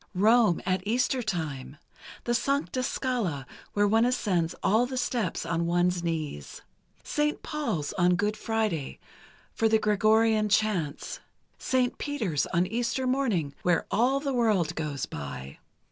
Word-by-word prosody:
Rome 215 -1 +4
at 185 0 +1
Easter 250 +3 +1
Time... 155 - -4 0.5
the 240 - 0
Sancta 275 +1 0
Scala, 230 - -2 0.3
where 205 0 +3
one 225 +2 +4
ascends 195 -9 0
all 225 +5 +3
the 260 0 -5
steps 230 -10 -1
on 170 0 -1
one's 175 +1 +1
knees; 155 - -4 0.4
Saint 300 0 -1
Paul's 245 - -2
on 180 0 +4
Good 210 +3 0
Friday, 215 - -2 0.6
for 225 - +2
the 220 - +5
Gregorian 215 +1 +3
Chants; 200 -8 0 0.4
Saint 255 -1 0
Peter's 215 - -1
on 175 +2 +1
Easter 235 +5 -1
Morning, 235 - 0
where 175 -2 +2
all 255 +5 +2
the 275 -1 -2
world 215 -10 +2
goes 150 -4 -3
by 70 -2 -7
210 Hz, 135 wpm, -28 LUFS, 170-240 Hz, 0.6 s, the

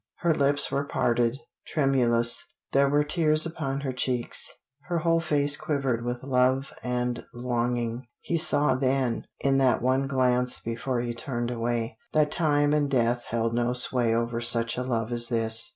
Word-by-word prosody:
Her 170 -1 +3
lips 145 -1 +1
were 140 - 0
parted 120 -3 0 0.3
tremulous; 120 -5 +1 0.2
there 140 0 +3
were 145 +1 +3
tears 155 0 +2
upon 140 -4 -3
her 135 -2 -2
cheeks; 125 -1 -1 0.4
her 175 -1 -1
whole 165 0 +2
face 145 -3 +1
quivered 135 -6 -1
with 120 +1 -4
love 130 0 +1
and 125 -1 -2
longing. 120 0 -2
He 170 - -3
saw 150 -3 +3
then, 130 -2 0 0.2
in 135 0 +2
that 130 -3 +3
one 130 +2 +1
glance 125 -2 +1
before 120 +2 -3
he 120 -1 -3
turned 120 -2 -4
away, 115 -1 -2
that 150 -1 +3
time 145 -3 +2
and 145 -1 +1
death 120 -2 +1
held 115 0 -1
no 120 +1 0
sway 125 -2 +2
over 115 0 -1
such 115 0 +2
a 125 - -2
love 120 -2 -2
as 120 0 0
this. 115 0 0
125 Hz, 165 wpm, -26 LUFS, 120-140 Hz, 0.4 s, Her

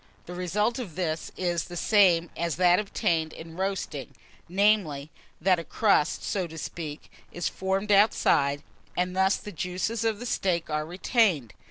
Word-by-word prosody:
The 175 - -8
result 210 +7 0
of 195 -11 -6
this 160 -3 -2
is 175 -3 -1
the 175 - -8
same 175 -5 +4
as 170 -1 -1
that 180 0 +4
obtained 165 -6 -1
in 165 0 -10
roasting; 190 -7 -3 0.3
namely, 180 -7 +2 0.3
that 185 +1 +3
a - - -5
crust, 200 -5 +2
so 185 -3 -1
to 160 0 -10
speak, 155 -1 -6 0.2
is 175 - -2
formed 195 +2 -1
outside, 145 -8 +3 0.3
and 180 0 0
thus 190 +1 +3
the 210 - -8
juices 185 +5 -2
of 220 -2 0
the 245 0 -2
meat 175 -3 +1
are 150 0 -1
retained. 180 - +1
180 Hz, 160 wpm, -27 LUFS, 160-200 Hz, 0.3 s, same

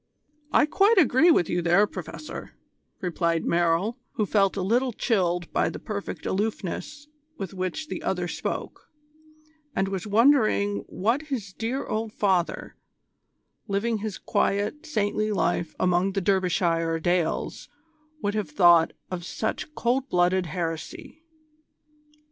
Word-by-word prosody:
"I - - +5
quite 400 +8 +3
agree 315 0 +5
with 175 - +4
you 175 - 0
there, 175 +4 +4
Professor," 165 - -8 0.5
replied 170 -2 0
Merrill, 175 +8 +1
who 215 - 0
felt 195 -1 +2
a 190 - -1
little 245 +6 +2
chilled 180 - 0
by - - +2
the - - -6
perfect 205 -2 -6
aloofness 220 - -3 0.3
with 195 - -5
which 185 - -3
the - - -5
other - - -1
spoke, - - -5 0.9
and 195 - +1
was 195 +1 -4
wondering 215 -3 +3
what 230 +9 0
his 220 -9 -4
dear 235 +7 -3
old 220 0 -3
father, 185 -4 0 0.9
living 215 +2 0
his 210 -2 -4
quiet, 210 +11 -1
saintly 215 -5 0
life 175 -4 0
among 180 +2 +2
the 195 - 0
Derbyshire 175 -3 +1
dales, 175 0 -1 0.5
would 205 - 0
have 210 -6 -2
thought 170 0 +5 0.2
of 180 -1 -4
such 220 - -4
cold 255 +3 0
blooded 180 0 +2
heresy. 165 - -5
195 Hz, 130 wpm, -26 LUFS, 175-225 Hz, 0.9 s, I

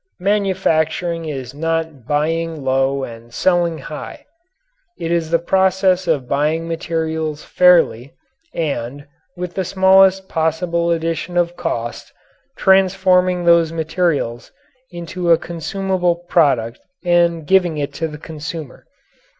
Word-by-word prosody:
Manufacturing 180 -4 0
is 135 -5 -6
not 160 -4 -3
buying 160 +1 -1
low 135 +1 +1
and 115 -1 -9
selling 175 +3 +1
high. 150 +1 -9 0.7
It 165 0 -4
is 170 -2 0
the 170 - +3
process 190 +1 +2
of 145 -6 0
buying 155 +4 0
materials 160 -2 -3
fairly 165 -9 +3 0.4
and, 140 -3 -4 0.3
with 180 0 -5
the 190 - -2
smallest 190 +1 +4
possible 170 +1 -1
addition 165 +1 -2
of 175 0 +1
cost, 120 -8 -4 0.5
transforming 185 -2 +3
those 170 -1 +4
materials 160 -7 -1 0.4
into 175 0 -4
a 165 - +7
consumable 180 +1 -2
product 140 -9 +1 0.3
and 170 -2 +2
giving 180 -2 +2
it 145 -1 -3
to 160 - -2
the 150 -1 -9
consumer. 155 -2 -8
165 Hz, 115 wpm, -19 LUFS, 150-180 Hz, 0.7 s, a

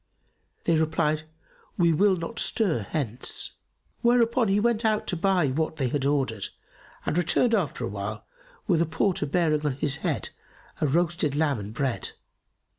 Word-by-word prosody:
They 165 -2 +3
replied, 155 -1 +1 0.5
"We 170 -2 +4
will 195 +4 +4
not 170 +6 -5
stir 165 - +2
hence." 125 -4 -1 0.5
Whereupon 235 0 +3
he 195 +1 +3
went 235 +1 +1
out 215 -1 +1
to 180 - -1
buy 180 -3 +2
what 155 +4 -1
they 135 -5 -1
had 140 +1 -1
ordered 135 -8 0 0.6
and - - -1
returned 175 +7 +2
after 165 - 0
awhile, 105 0 -5 0.4
with 170 -5 +2
a 170 - +1
porter 165 -1 0
bearing 155 -1 +1
on 145 -3 +1
his 140 +1 0
head - - -2 0.5
a 155 - +3
roasted 165 -1 +1
lamb 145 -5 +1
and 100 +1 -6
bread. 120 -3 -2
160 Hz, 155 wpm, -26 LUFS, 140-190 Hz, 0.6 s, We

